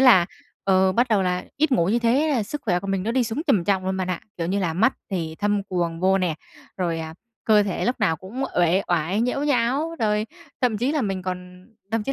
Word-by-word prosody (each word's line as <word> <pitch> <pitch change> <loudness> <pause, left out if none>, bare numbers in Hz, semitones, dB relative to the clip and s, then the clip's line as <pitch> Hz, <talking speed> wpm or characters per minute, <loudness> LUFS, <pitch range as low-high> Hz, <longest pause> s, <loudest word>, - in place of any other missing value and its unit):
là, 230 -10 +7 0.4
ờ, 190 -1 +4
bắt 240 +6 +2
đầu 210 -4 +3
là 180 -1 -1
ít 300 0 +2
ngủ 170 -7 +3
như 225 +4 +3
thế 245 +6 +2
là 265 -7 +1
sức 265 +8 -6
khỏe 180 -5 +1
của 195 - -7
mình 195 -1 -1
nó 225 +4 -1
đi 255 0 +2
xuống 225 +7 -3
trầm 215 - +3
trọng 190 0 +1
luôn 190 0 0
bạn 185 -1 -2
ạ. 185 - -2 0.2
Kiểu 165 - -1
như 190 +3 0
là 175 -4 0
mắt 220 +10 +3 0.2
thì 165 -4 -3
thâm 205 -1 +1
quầng 170 -3 -2
vô 190 +1 +3
nè, 180 -4 0 0.4
rồi, 170 -3 -1
à, 160 0 -6 0.3
cơ 215 -2 +5
thể 200 -2 -2
lúc 245 0 -1
nào 185 -6 +2
cũng 225 +11 -5
uể 175 +2 +3
oải, 175 +4 +1
nhễu 250 +4 0
nhão, 280 +4 +1
rồi 210 -1 +1 0.3
thậm 240 -5 +1
chí 250 +6 +1
là 300 -3 0
mình 195 -3 -2
còn 180 0 -6 0.3
thậm 225 -1 +1
chí 275 - -2
195 Hz, 250 wpm, -23 LUFS, 180-235 Hz, 0.4 s, là